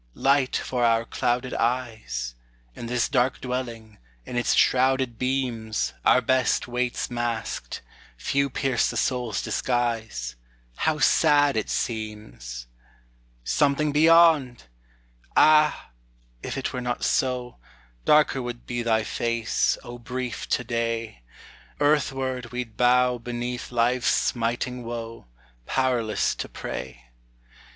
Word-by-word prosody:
Light 135 -1 +2
for 125 -2 -1
our 115 -1 +3
clouded 125 +2 -1
eyes! 110 - -2 0.4
In 115 - -7
this 125 0 +1
dark 125 -2 +1
dwelling, 120 -4 -5 0.3
in - - -7
its 120 - +2
shrouded 130 -2 +2
beams, 115 - -1
Our 125 - +5
best 130 +1 +1
waits 125 +1 -2
masked, 120 -1 -3 0.3
few 140 - 0
pierce 130 -2 0
the - - -4
soul's 125 -5 -1
disguise; 115 - -2 0.4
How 160 -1 +1
sad 145 -2 +4
it 110 - -1
seems! 105 - -4 0.8
Something 145 - +1
beyond! 160 -4 +5 0.7
Ah, 155 - +4 0.5
if - - -5
it 135 - -3
were 125 - -3
not 125 0 -3
so, 125 -2 0 0.5
Darker 150 -3 +4
would 120 -1 -6
be 120 -1 -3
thy 110 -1 +1
face, 115 +1 0
O 120 0 -9
brief 125 0 -5
To 125 - +1
day; 115 - -3 0.6
Earthward 135 -4 0
we 125 0 -2
'd 115 -3 -21
bow 125 0 +3
beneath 120 +1 -5
life's 120 +1 +1
smiting 120 +1 0
woe, 115 - -7 0.4
Powerless 125 -5 +1
to - - -6
pray. 60 -1 -7
120 Hz, 115 wpm, -25 LUFS, 115-130 Hz, 0.8 s, Our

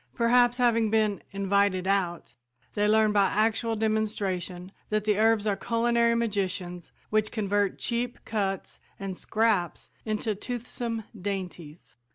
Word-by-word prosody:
Perhaps 245 +1 +4
having 230 -3 +3
been 215 -2 +1
"invited 200 -1 +1
out," 175 -11 -1 0.4
they 205 0 +1
learn 215 0 +4
by 200 -2 +4
actual 225 +3 +1
demonstration 200 -4 -2 0.2
that 215 -1 0
the 210 -1 +1
herbs 220 -1 +3
are 205 -2 +1
culinary 235 +1 +2
magicians 190 -6 -2 0.2
which 215 0 +1
convert 205 -2 0
cheap 240 0 -2
cuts 195 -3 -3 0.2
and 195 -2 -4
"scraps" 210 -5 0
into 215 0 -1
toothsome 235 +1 -4
dainties. 180 - -6
210 Hz, 125 wpm, -27 LUFS, 195-225 Hz, 0.4 s, Perhaps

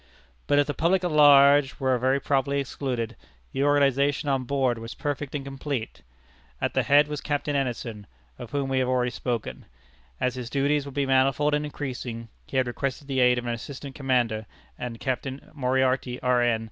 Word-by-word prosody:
But 145 - +3
if 145 - +4
the 145 - -3
public 180 +4 +1
at 175 - 0
large 145 -2 +6
were 130 -2 +2
very 130 +3 +2
properly 140 0 0
excluded, 125 -4 -3 0.4
the 135 - -1
organization 140 0 +2
on 135 -2 0
board 130 -3 0
was 115 +1 -8
perfect 145 -1 -4
and 140 -1 -4
complete. 135 - -5 0.6
At - - -1
the - - +2
head 145 +1 +5
was 150 -1 -4
Captain 145 0 -2
Anderson, 120 -6 -3 0.3
of 120 - -8
whom 140 -1 -1
we 135 0 +1
have 130 - +1
already 125 -1 +1
spoken. 120 -3 -4 0.5
As 125 - 0
his 125 -2 -6
duties 140 +2 +1
would 140 -1 -9
be 140 -1 +1
manifold 135 +2 +2
and 150 0 +1
increasing, 125 -5 -6 0.2
he 135 - -3
had 130 - +3
requested 135 +3 -4
the 135 -2 -1
aid 125 -1 +5
of 120 - -3
an 120 - -1
assistant 135 +3 -7
commander, 120 -6 0 0.3
and 120 -2 -6
Captain 130 +1 -4
Moriarty, 130 -2 0
R. 125 -1 +2
N. 120 -2 +2
135 Hz, 185 wpm, -26 LUFS, 125-145 Hz, 0.6 s, large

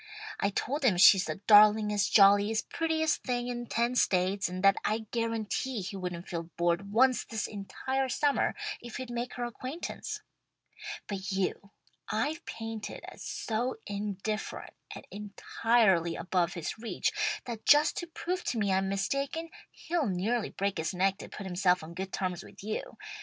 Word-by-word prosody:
I 200 - +2
told 275 +8 -2
him 215 -9 +4
she's 195 0 +8
the - - -5
darlingest, 210 -1 +6
jolliest, 205 +2 +5
prettiest 320 -1 +1
thing 245 -1 -2
in 240 -1 -4
ten 235 +2 +1
states, 190 -4 +2
and 185 +1 -5
that 195 0 +6
I'd 220 0 -2
guarantee 230 +1 -1
he 190 +2 -5
wouldn't 180 -2 -5
feel 170 -2 -5
bored 175 +3 0
once 255 +3 +4
this 225 -2 -3
entire 260 +6 -3
summer 285 +3 +1 0.3
if 240 -2 -7
he'd 255 -1 -6
make 240 +1 -4
her 245 - -3
acquaintance. 280 - -5 0.8
"But 195 0 -4
you 195 +1 -2 0.4
I've 305 +10 -1
painted 225 -1 -6
as - - -14
so 255 - -2
indifferent 205 +1 -4 0.2
and - - -10
entirely 205 -3 +1
above 180 -2 0
his 170 +5 -4
reach, 220 -5 -1 0.3
that 230 -3 -6
just 295 +1 +6
to 345 - -3
prove 355 +2 -3
to 240 - -1
me 200 -3 +1
I'm 190 0 +1
mistaken, 275 +11 -2 0.2
he'll 325 -5 -2
nearly 205 +5 0
break 195 -2 -2
his 160 +3 -2
neck 195 +2 +1
to - - -9
put 205 - -8
himself 180 -1 +2
on 160 +2 -9
good 190 +2 -5
terms 180 -2 -2
with - - -13
you. 215 +1 -4
210 Hz, 160 wpm, -30 LUFS, 190-245 Hz, 0.8 s, she's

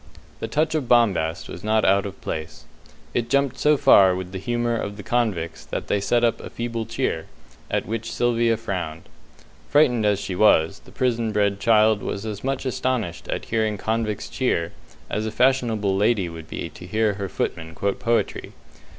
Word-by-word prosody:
The - - -3
touch 155 +1 0
of 150 -6 -1
bombast 95 -9 +2
was 90 - -9
not 110 0 +2
out 100 +1 +3
of 100 - -10
place. 80 0 -5 0.5
It 120 -1 -1
jumped 140 0 +1
so 150 0 +4
far 100 -10 +6
with 90 0 -5
the 95 - -5
humour 120 +2 -1
of 100 -2 -4
the 105 - -8
convicts 95 -9 -1
that - - -4
they 100 - +1
set 120 +4 +2
up 115 -1 +2
a - - -8
feeble 115 -1 -4
cheer, 115 -8 -2 0.4
at - - -1
which 115 0 -4
Sylvia 120 -1 +2
frowned. 90 -8 -4 0.7
Frightened 135 -6 +4
as 105 -2 +2
she 95 - -4
was, 90 -2 +4
the - - -15
prison 120 -3 0
bred 100 -1 +1
child 110 -1 +4
was 100 +2 -4
as 105 -2 -5
much 135 +1 -2
astonished 125 -9 -2
at - - -3
hearing 110 -2 0
convicts 110 0 -2
cheer 85 -10 -1 0.4
as 110 +1 -2
a - - -3
fashionable 115 -6 +2
lady 105 -1 +2
would 80 -1 -9
be - - -4
to 90 - -12
hear 110 +2 +1
her 100 -1 -5
footman 80 -1 -3
quote 100 0 -1
poetry. 115 0 -1
110 Hz, 185 wpm, -23 LUFS, 95-120 Hz, 0.7 s, far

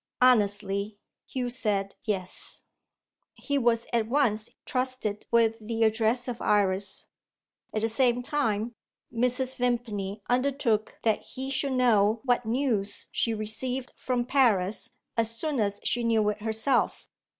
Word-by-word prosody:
Honestly, 205 -4 +2 0.3
Hugh 250 -2 -3
said 205 -5 -1
Yes. 190 -4 -3 0.7
He 285 0 -1
was 235 -2 +2
at 230 -2 +2
once 230 -4 +1 0.2
trusted 255 -5 -2
with 225 -1 +3
the 225 +1 -1
address 225 +3 +2
of 240 -2 -4
Iris. 195 -1 +2 0.6
At 215 - -2
the 225 - +2
same 245 +1 +2
time, 240 -6 -1 0.4
Mrs. 250 +2 +1
Vimpany 220 -5 -2
undertook 245 -4 0
that 220 -2 +2
he 265 +1 -6
should 275 0 0
know 220 -4 +3
what 245 -2 +1
news 230 -5 -1
she 230 -1 0
received 245 +4 -2
from 250 -2 -1
Paris 230 -5 +2 0.3
as 230 0 0
soon 295 +1 -1
as 205 -1 0
she 240 - 0
knew 225 -2 +2
it 210 0 -4
herself. 225 +4 +1
230 Hz, 130 wpm, -27 LUFS, 210-250 Hz, 0.7 s, with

